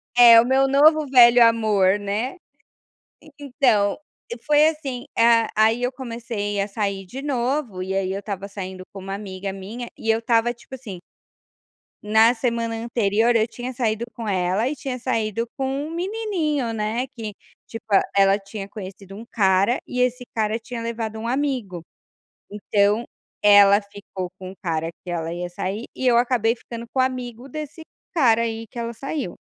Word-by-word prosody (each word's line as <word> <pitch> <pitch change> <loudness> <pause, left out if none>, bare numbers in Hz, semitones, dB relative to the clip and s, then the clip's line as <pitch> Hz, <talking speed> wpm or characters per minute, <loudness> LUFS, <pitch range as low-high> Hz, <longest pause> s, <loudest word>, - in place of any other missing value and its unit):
É 235 -2 +9
o - - -2
meu 265 +1 +3
novo 305 +3 +5
velho 240 -2 +7
amor, 210 -4 +3
né. 215 - -3 0.9
En 305 - -16
então, 250 -8 +1 0.5
foi 300 0 +5
assim, 275 -6 -4
a 230 -1 +4
aí 220 +3 +3
eu 250 +1 0
comecei 230 -5 -4
a 200 - -1
sair 200 -2 -3
de 265 +9 -8
novo, 255 -6 -2
e 190 +1 -3
aí 190 -1 -1
eu 195 - -3
estava 200 -1 -6
saindo 190 -2 -7
com 195 - -8
uma 195 +1 -5
amiga 195 -1 -6
minha, 210 +6 -7
e 225 - -2
eu 225 - +3
estava 230 0 +1
tipo 245 +2 -13
assim 225 -8 -8 1.1
na 220 +3 +5
semana 230 -1 -1
anterior 225 0 +1
eu 220 0 +3
tinha 245 +2 -7
saído 230 -2 -1
com 230 -2 -6
ela 190 +4 0
e 300 - -3
tinha 260 -2 -5
saído 230 -2 -1
com 270 - -1 0.2
um - - -8
menininho, 345 - -2
né, 225 +3 -2
que 225 -6 -7 0.3
tipo, 225 - -9
ah, 195 - +6
ela 195 0 +5
tinha 200 0 -8
conhecido 195 -1 -9
um 220 +3 -9
cara 195 +1 +2
e 250 - -2
esse 250 0 0
cara 220 0 0
tinha 235 +1 -7
levado 225 -1 -4
um 225 - -4
amigo, 250 - -2 0.7
então 205 +2 +1 0.4
ela 205 -1 +7
ficou 200 -3 -8
com 185 0 -7
o - - -14
cara 165 -4 -2
que 180 - -9
ela 165 -1 -3
ia 175 +1 -4
sair 195 +6 -4
e 260 - -1
eu 240 -1 +5
acabei 240 -2 +2
ficando 235 0 -9
com 265 - -2
o - - +5
amigo 250 -1 -4
desse 305 +3 -7 0.3
cara 240 -9 +4
aí 225 -1 -3
que 235 - -9
ela 235 0 -3
saiu. 270 - -5
230 Hz, 175 wpm, -22 LUFS, 200-250 Hz, 1.1 s, É